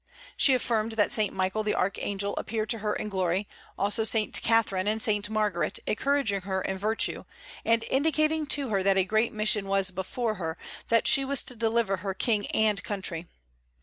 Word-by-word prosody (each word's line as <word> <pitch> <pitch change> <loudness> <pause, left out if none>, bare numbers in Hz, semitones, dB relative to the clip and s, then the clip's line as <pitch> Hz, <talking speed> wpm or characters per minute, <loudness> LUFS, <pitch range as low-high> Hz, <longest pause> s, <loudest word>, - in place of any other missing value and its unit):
She 270 - +4
affirmed 225 -3 -1
that 210 -2 +1
Saint 215 -2 +1
Michael 190 +3 -1
the 215 0 -1
Archangel 200 +1 -1
appeared 215 -1 -2
to 230 - -1
her 210 0 -1
in - - -4
glory, 190 0 -1 0.3
also 205 +2 +1
Saint 220 0 +1
Catherine 210 -4 +2
and 215 +1 +1
Saint 210 -3 0
Margaret, 210 -5 0
encouraging 245 -4 0
her 190 0 -2
in 190 +1 -3
virtue, 215 +3 0 0.4
and 230 0 +2
indicating 310 +2 +1
to 285 -3 0
her 200 -3 +1
that 195 0 +2
a 190 - +3
great 220 +4 +1
mission 215 -2 +1
was 195 -1 +2
before 215 +5 -2
her, 160 0 -3 0.3
that 230 0 +3
she 275 - +5
was 275 0 +1
to 250 - -8
deliver 225 -3 +1
her 190 +1 -4
king 210 -2 0
and 210 -3 +1
country. 185 -4 -4
215 Hz, 180 wpm, -27 LUFS, 195-230 Hz, 0.4 s, she